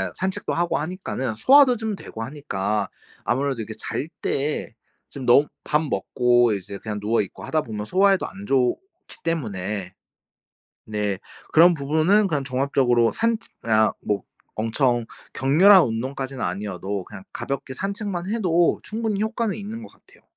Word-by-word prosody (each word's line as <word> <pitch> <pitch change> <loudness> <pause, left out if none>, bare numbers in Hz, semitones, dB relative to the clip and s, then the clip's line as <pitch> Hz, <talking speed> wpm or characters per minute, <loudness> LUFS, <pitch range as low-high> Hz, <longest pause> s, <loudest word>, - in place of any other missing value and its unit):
산책도 190 0 -2
하고 175 +1 +1
하니까는 150 - -3
소화도 260 - +6
좀 220 -1 -3
되고 115 - -9
하니까 105 -7 -2 0.3
아무래도 130 -1 0
이렇게 110 0 -6
잘 145 - -3
때 145 +2 -2 0.4
좀 135 -2 -7
너무 135 +5 +6 0.2
밥 150 +1 +1
먹고 120 -2 +2
이제 100 0 -5
그냥 105 0 -5
누워있고 105 -2 -1
하다 155 -1 0
보면 105 -3 -5
소화에도 195 - +3
안 200 +1 -10
좋기 135 - -1
때문에 100 - -3 1.0
네 105 -2 -2 0.3
그런 170 +2 +7
부분은 160 +8 +2
그냥 145 -5 -1
종합적으로 130 -3 +2
산책 230 0 -1
그냥 110 -1 +3
뭐 100 -2 -1 0.3
엄청 120 +2 +1 0.3
격렬한 180 +9 +6
운동까지는 130 +3 -4
아니어도 95 +1 -3
그냥 95 -1 -11
가볍게 135 -1 -4
산책만 195 - -3
해도 175 -6 +2
충분히 220 -2 -2
효과는 220 -1 -1
있는 215 +2 -6
것 - - -11
같아요. - - -23
135 Hz, 320 characters per minute, -23 LUFS, -, 1.0 s, 그런